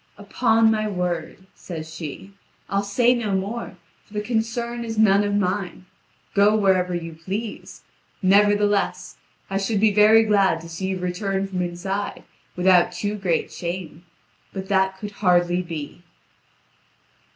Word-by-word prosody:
"Upon 225 +2 +2
my 215 -1 0
word," 180 -2 -3
says 160 -2 -8
she, 160 +5 -8 0.4
"I'll 200 0 +2
say 235 +5 +3
no 220 -5 -1
more, 200 +1 -4 0.3
for 210 - -17
the 210 - 0
concern 235 +1 -2
is 225 -1 -5
none 205 -2 +5
of 205 0 0
mine. 185 -2 -2 0.5
Go 205 +1 +4
wherever 185 -3 +2
you 165 -1 -5
please. 195 +7 -6 0.4
Nevertheless, 205 +1 +2 0.3
I 195 0 -1
should 200 +1 0
be 215 0 +3
very 215 +2 +6
glad 200 -6 +3
to 165 - -11
see 170 +3 -4
you 190 0 -2
return 190 +2 -2
from 190 -2 -3
inside 180 +3 -4 0.3
without 180 -1 +4
too 205 +4 -3
great 190 -5 -1
shame; 170 -2 -6 0.5
but 190 0 -7
that 190 -1 +2
could 205 +1 -7
hardly 180 -3 +2
be." 165 -2 -7
195 Hz, 140 wpm, -23 LUFS, 180-210 Hz, 0.5 s, very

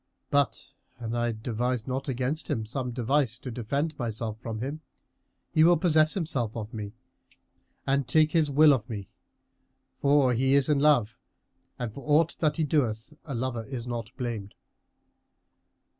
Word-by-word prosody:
But, 145 -1 +1 0.3
an 115 -2 -5
I 120 0 0
devise 115 +1 -2
not 135 +1 -3
against 130 +5 -2
him 115 -8 -1
some 125 +3 -3
device 125 0 0
to 130 0 -7
defend 140 +7 -2
myself 110 -2 -3
from 115 -2 -5
him, 140 +6 -4 0.7
he 155 - +4
will 175 +1 +6
possess 155 -1 +3
himself 135 - -2
of 110 +2 -6
me 105 -2 -6 0.9
and 135 -1 +1
take 155 -1 +4
his 160 -3 +2
will 150 +1 +6
of 125 -2 -2
me; 100 -4 -6 0.9
for 140 -3 +4
he 130 +3 +2
is 140 +1 +3
in 145 -2 +3
love 140 -7 +3 0.6
and 120 -3 -4
for 140 - -9
aught 155 +2 +3
that 150 -2 +1
he 160 - +1
doeth 130 -4 0
a 140 -5 -4
lover 120 -2 -2
is 125 -2 -6
not 120 -2 -4
blamed." 115 -5 -4
130 Hz, 160 wpm, -27 LUFS, 115-150 Hz, 0.9 s, will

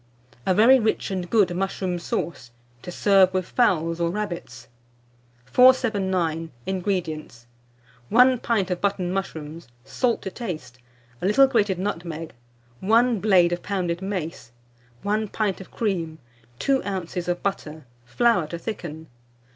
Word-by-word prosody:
A 185 - +3
VERY 245 +6 +7
RICH 220 -3 -1
AND 180 -2 -3
GOOD 195 -6 +3
MUSHROOM 185 -1 -2
SAUCE, 170 -6 -4 0.3
to 180 - -7
serve 195 0 +4
with 185 -1 0
Fowls 165 -9 +1
or 170 - +2
Rabbits. 190 -2 -5 0.8
479. 190 - +3 0.2
INGREDIENTS. 175 - -3 0.6
1 250 +2 +5
pint 200 -6 0
of 180 - -2
mushroom 190 -3 0 0.4
buttons, 165 -2 -11 0.2
salt 235 - -1
to 190 - -4
taste, 155 - -7 0.4
a 185 - 0
little 270 +7 +6
grated 215 -8 +1
nutmeg, 165 -4 -4 0.5
1 230 +3 +3
blade 185 -4 +4
of 175 - -3
pounded 180 -3 -2
mace, 180 -10 -5 0.5
1 215 +2 0
pint 200 -2 -2
of 190 - -12
cream, 170 -8 -2 0.4
2 270 - +1
oz. 180 -3 -4
of 175 0 -2
butter, 160 -7 -4 0.2
flour 185 - +2
to 170 - -5
thicken. 170 -5 -6
185 Hz, 130 wpm, -24 LUFS, 170-210 Hz, 0.8 s, VERY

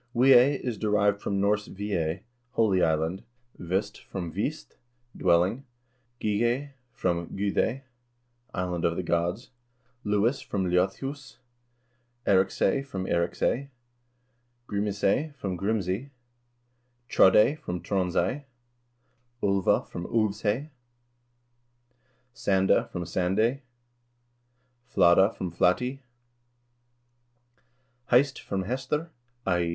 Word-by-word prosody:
Wiay 130 +2 +6
is 120 -5 -4
derived 105 -1 +2
from 100 -1 -1
Norse 105 +1 +1
Ve 105 +1 -5
ey 80 +1 -1 0.3
(holy 100 -5 +3
island), 80 +3 +1 0.4
Vist 95 +4 -2
from 90 -4 -5
Vist 110 - -4 0.4
(dwelling), 90 +8 +2 0.6
Gighay 120 +7 0 0.2
from 85 -8 -2
Gudey 105 +6 0 0.7
(island 90 -4 -3
of 85 - +1
the 90 - -2
gods), 85 +8 -1 0.5
Lewis 105 +6 +1
from 95 -2 -2
Ljodhus, 95 +11 -1 0.9
Eriksay 95 +5 +2
from 95 -9 -5
Eirih 85 -1 0
ci/, 140 +3 0 1.0
Grimisay 105 +8 0
from 100 -9 -4
Grims 100 +1 -1
ey, 105 +10 -2 1.0
Trodday 105 +11 +5
from 90 - -4
Tronds 90 0 -1
ey, 130 +11 0 1.0
Ulva 100 -2 +2
from 85 0 -6
Ulvs 110 -2 0
ey, 120 +9 -1 1.6
Sanda 95 -4 +2
from 85 - -4
Sand 90 +2 -1
ey, 120 +5 +2 1.3
Fladda 90 +4 +5
from 90 -2 -4
Flat 90 +2 +3
ey, 135 +2 -4 2.1
Heist 130 +2 +4
from 95 -1 -3
Hestr 135 - -2 0.4
(i. 90 -2 +2
100 Hz, 105 wpm, -27 LUFS, 90-120 Hz, 2.1 s, Wiay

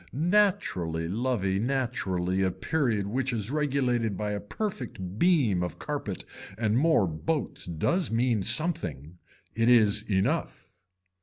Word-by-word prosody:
Naturally 140 - +1
lovey 100 -2 0
naturally 100 -8 -1
a 95 - +2
period 110 - -1
which 130 +5 -1
is 110 -1 -2
regulated 130 -8 0
by 105 -1 -2
a 105 - -2
perfect 105 - -5
beam 140 - +3
of 90 -1 -4
carpet 140 -6 -4 0.3
and 110 -1 +1
more 150 -5 +4
boats 115 - -3
does 125 - 0
mean 115 -1 +1
something. 90 - 0 0.3
It 115 +2 +2
is 105 -4 +5
enough. 110 - -1
115 Hz, 125 wpm, -28 LUFS, 95-140 Hz, 0.3 s, is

